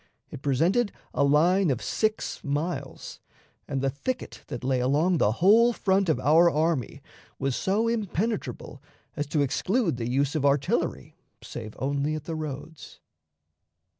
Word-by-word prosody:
It - - -8
presented 170 - +1 0.2
a - - +2
line 170 +6 +4
of 130 -4 0
six 220 +6 -2
miles, 145 -2 -4 0.5
and 135 -2 -2
the 135 - +2
thicket 245 - -5
that 120 - -6
lay 130 0 +1
along 150 +7 +2
the 105 - +3
whole 225 - +5
front 195 -4 +1
of 155 - +2
our 160 +6 +5
army 155 -6 -1 0.3
was 135 -2 -1
so 210 +4 0
impenetrable 220 -1 -3 0.3
as 145 -2 -3
to 145 0 0
exclude 180 - 0
the 115 0 -3
use 135 +2 +1
of 155 -3 -1
artillery 140 -1 0 0.3
save 110 -3 -8
only 140 +3 -1
at 155 - -5
the 165 - -5
roads. 155 0 -7
150 Hz, 145 wpm, -26 LUFS, 135-185 Hz, 0.5 s, whole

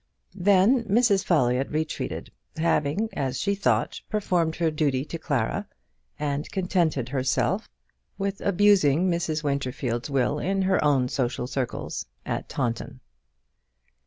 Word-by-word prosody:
Then 200 +6 +4
Mrs. 205 -2 +3
Folliott 130 -5 +2
retreated, 155 +1 -3 0.3
having, 160 +4 +1
as 130 -2 -2
she 200 +1 +1
thought, 200 - 0
performed 175 -6 0
her 165 -1 +1
duty 145 -3 0
to 165 - -6
Clara, 150 - -1 0.5
and 145 -1 -2
contented 170 -9 0
herself 130 - +1
henceforth - - -27 0.5
with 195 0 -3
abusing 185 -4 +4
Mrs. 160 -2 -1
Winterfield's 130 -3 -2
will 140 +2 +1
in 195 +1 0
her 190 0 +2
own 140 -4 +3
social 125 -1 -1
circles 130 -1 -4 0.2
at - - -3
Taunton. 120 -4 -3
155 Hz, 125 wpm, -26 LUFS, 135-190 Hz, 0.5 s, Then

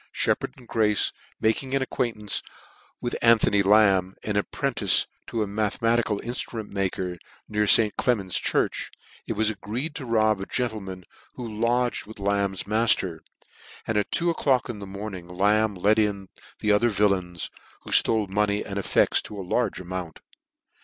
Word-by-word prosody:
bheppard - - 0
and 125 -2 -16
Grace 105 -3 +2 0.3
making 130 +5 0
an 135 - +2
acquaintance 115 -5 -2 0.6
with 120 - -3
Anthony 110 -3 +5
Lamb, 95 -2 +4
an 105 - -2
apprentice 105 0 +1 0.2
to 115 -2 -1
a - - -4
mathe 105 0 -1
matical 115 -2 +1
inftrument 115 -2 -5
maker 95 -2 -2 0.3
near 105 0 0
St. 105 0 +6
Clement's 100 -8 0
church, - - 0 0.4
it - - -1
was 110 0 +1
agreed 110 +9 -4
to 135 -5 -7
rob 110 -3 +2
a 95 - -5
gentleman 105 -7 -3 0.3
who 125 - -6
lodged 115 +2 0
with 110 - -11
Lamb's 100 -1 0
mafter, 105 -5 +1 0.7
and 110 - -2
at 105 -1 +1
two 170 0 +1
o'clock 135 -6 +1
in 110 -4 -5
the 100 - -8
morning 100 -2 -7
Lamb 105 +4 +2
let 105 +4 +3
in 100 -3 -1 0.3
the 105 - +2
other 105 +3 +4
villains, 95 -5 0 0.3
who - - -10
jflole 110 -2 +4
money 105 +1 0
and 100 0 -4
effects - - +2
to 105 - -9
a 95 - -5
large 110 +2 0
amount. 90 -2 -6
105 Hz, 160 wpm, -25 LUFS, 100-115 Hz, 0.7 s, St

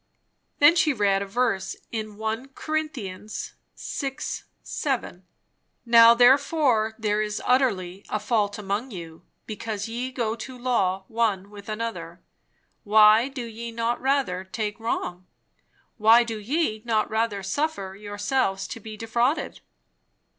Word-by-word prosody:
Then 295 +3 +7
she 315 -3 +3
read 200 -4 +2
a 200 - -4
verse 225 -2 0 0.2
in 215 -2 -5
1 220 +4 -3
Corinthians 250 -11 -4 0.2
vi. 270 -1 -4 0.5
7. 235 -10 -3 0.6
"Now 230 0 +8
therefore 250 -3 +4
there 210 -1 0
is 210 0 -2
utterly 200 -8 +1
a 215 - -1
fault 210 -2 0
among 210 +5 -3
you, 165 -6 -9 0.2
because 215 -1 -4
ye 245 +3 -4
go 230 -3 -1
to 250 +3 -8
law 195 -7 0
one 210 -4 -1
with 205 0 -11
another. 190 -6 -5 0.6
Why 215 +3 +6
do 265 -3 -6
ye 230 +1 -7
not 230 +1 -1
rather 265 -9 0
take 210 +2 -4
wrong? 185 -5 -3 0.7
why 225 +2 +6
do 225 -2 -5
ye 220 -1 -1
not 220 -2 +1
rather 220 -2 -1
suffer 195 -3 -2
yourselves 205 0 -1
to - - -6
be 215 0 -9
defrauded?" 235 +6 -1
220 Hz, 130 wpm, -25 LUFS, 205-245 Hz, 0.7 s, Now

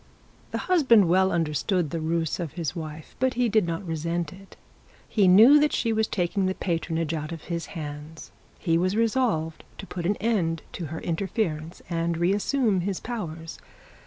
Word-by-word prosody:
The - - -3
husband 260 - +5
well 190 +2 +3
understood 165 +1 0
the 165 - -2
rule 165 +1 0
of 165 -5 -4
his 165 -2 -3
wife, 155 -2 -7
but 260 +1 +1
he 245 0 +2
did 215 -4 +2
not 165 +3 -3
resent 165 +2 -2
it. 195 +1 -15 0.5
He 205 -4 +3
knew 225 +11 +8
that 300 -1 +2
she 230 -2 +1
was 220 0 +1
taking 185 +1 0
the 190 - -1
patronage 165 -2 -2
out 155 0 -4
of 165 -2 -7
his 170 -1 -4
hands; 150 +1 -7 0.3
he 165 -2 +1
was 185 +3 +1
resolved 225 -9 0
to - - -7
put 175 -3 -4
an 205 - +2
end 185 -8 0
to 175 - -5
her 160 +2 -6
interference, 170 -2 -2
and 170 -1 -1
re 175 +3 +2
assume 210 -2 +1
his 190 +1 -2
powers. 165 -9 -6
175 Hz, 180 wpm, -26 LUFS, 165-205 Hz, 0.5 s, knew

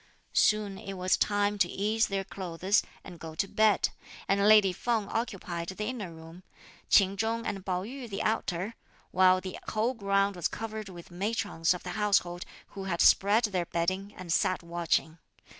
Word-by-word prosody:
Soon 210 -2 +2
it 195 - -7
was 185 0 +1
time 205 0 +1
to 175 - +3
ease 215 +4 +1
their 195 -1 -2
clothes, 185 +1 0 0.2
and 175 -3 -11
go 160 0 -8
to 195 - 0
bed; 215 0 +3 0.4
and 200 +1 +3
lady 210 -3 +6
Feng 225 +1 -1
occupied 195 -7 -3
the 200 +3 -4
inner 215 -7 -4
room; 165 +2 -12 0.5
Ch'in 195 -1 +5
Chung 225 +3 -1
and 195 -2 -3
Pao 185 -1 -2
yü 250 +2 -7
the 195 0 -3
outer; 200 -2 -1 0.4
while 185 0 +5
the 185 0 -7
whole 220 +4 0
ground 200 -3 +1
was 175 - 0
covered 220 -2 -6
with 175 -2 -11
matrons 190 -3 0
of 180 - -9
the 180 - -5
household, 180 -3 +1 0.2
who 195 -1 -7
had 170 -3 -2
spread 205 +4 +5
their 185 -6 -1
bedding, 185 +4 -1
and 175 -3 -3
sat 185 0 +1
watching. 170 -1 -1
195 Hz, 175 wpm, -29 LUFS, 180-210 Hz, 0.5 s, lady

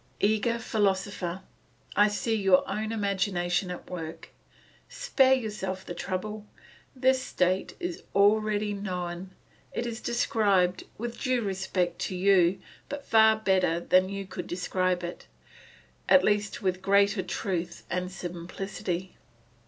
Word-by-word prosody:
Eager 220 +3 +2
philosopher, 195 -4 -1 0.5
I 205 +1 +6
see 210 +2 -1
your 195 -3 +4
own 215 +1 -2
imagination 190 -3 0
at 180 - -7
work. 165 -3 -7 0.6
Spare 270 - +3
yourself 205 -6 -4
the - - -5
trouble; 205 +4 -4 0.5
this 260 0 +3
state 185 -4 0
is 355 -1 -4
already 210 +1 +3
known, 180 -2 -4 0.4
it 235 - -3
is 235 -1 -5
described, 200 -6 +1
with 235 +1 -5
due 255 -3 +1
respect 190 -3 -1
to 185 - -3
you, 185 -1 +4 0.4
far 220 -3 +5
better 190 -5 +2
than 185 +2 +3
you 195 0 -4
could 180 -2 -7
describe 180 0 -1
it, 175 0 -7 0.8
at 280 - +7
least 205 0 0
with 185 -1 0
greater 200 +1 +3
truth 180 -2 -3
and 180 +1 -2
simplicity. 180 0 -5
195 Hz, 120 wpm, -28 LUFS, 180-215 Hz, 0.8 s, at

